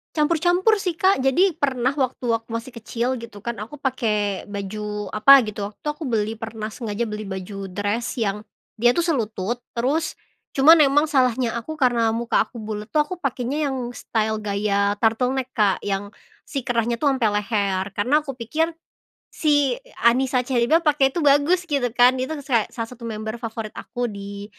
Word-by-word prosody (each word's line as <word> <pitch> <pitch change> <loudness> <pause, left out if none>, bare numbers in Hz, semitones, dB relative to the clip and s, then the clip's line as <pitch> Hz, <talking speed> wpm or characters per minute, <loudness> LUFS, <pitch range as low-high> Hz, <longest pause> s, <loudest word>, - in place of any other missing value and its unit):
Campur-campur 350 +7 +3
sih, 365 -5 -3
Kak. 375 -8 +3
Jadi, 340 +6 +3
pernah 265 -3 0
waktu 260 -3 -2
aku 225 0 -7
masih 230 +2 -5
kecil 235 +2 -2
gitu 230 -4 -9
kan, 235 +3 -4
aku 280 +7 -11
pakai 215 -7 -1
baju 210 +1 -5
apa 275 +6 +8
gitu, 205 -1 -4
waktu 300 - -11
aku 300 +2 -3
beli 225 -4 -1
pernah 225 -1 -6
sengaja 220 0 -4
beli 210 0 -5
baju 195 0 -6
dress 205 +6 -2
yang 210 -1 -1 0.3
dia 240 +1 +4
tuh 340 +6 0
selutut. 235 - -2
Terus 285 +7 -1 0.3
cuman 290 +5 +7
emang 290 +2 +3
salahnya 255 -5 +1
aku 305 +7 -5
karena 240 -4 +3
muka 230 +1 +1
aku 235 - -11
bulet 215 0 -6
tuh 305 - +2
aku 365 - -4
pakainya 275 +2 -1
yang 265 - -3 0.2
style 220 -1 -1
gaya 200 0 0
turtleneck, 250 +3 +1
Kak, 205 -4 +2
yang 200 0 -3 0.3
si 275 - -4
kerahnya 235 -1 0
tuh 300 - +1
sampe 225 -5 +1
leher, 200 -2 0
karena 255 +9 +3
aku 285 -3 -7
pikir 265 +7 -1 0.7
si 290 -4 +2
e - - -22 0.2
Anisa 250 +1 +3
Cherrybelle, 265 +7 +2
pake 285 -3 +4
itu 320 +2 -2
bagus 290 +6 +4
gitu 280 -7 0
kan, 245 +2 +5
dia 260 0 -3
tuh 315 - -3
sus - - -17
kek 225 -3 +2
salah 230 -2 -4
satu 250 -1 -13
member 220 0 -5
favorit 225 -2 -5
aku 245 0 -4
di, 200 -2 -6
235 Hz, 180 wpm, -23 LUFS, 215-275 Hz, 0.7 s, apa